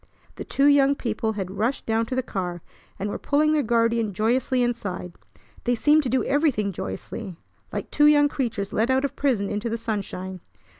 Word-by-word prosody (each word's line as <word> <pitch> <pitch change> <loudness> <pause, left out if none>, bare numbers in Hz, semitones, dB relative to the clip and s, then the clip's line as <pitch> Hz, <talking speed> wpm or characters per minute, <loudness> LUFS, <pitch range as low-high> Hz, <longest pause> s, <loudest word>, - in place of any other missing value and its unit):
The - - -7
two 275 - +1
young 285 -1 +5
people 220 -3 -2
had 190 -3 -4
rushed 235 +6 0
down 225 0 0
to 255 - -3
the 260 - 0
car, 180 -7 -4 0.3
and 200 - -3
were 205 - -4
pulling 300 +2 +2
their 305 - +3
guardian 230 -3 +1
joyously 245 +4 +1
inside. 200 -7 -3 0.5
They 245 0 +2
seemed 300 +6 +4
to 265 - -3
do 260 +2 +1
everything 275 -9 +1
joyously, 180 - -6 0.3
like - - -5
two 295 0 +5
young 290 -1 +6
creatures 230 -8 -3
let 225 +3 +1
out 265 +1 +2
of 280 - -4
prison 240 -8 +1
into 210 +3 -2
the 230 - -2
sunshine. 195 -4 -4
230 Hz, 190 wpm, -24 LUFS, 205-270 Hz, 0.5 s, young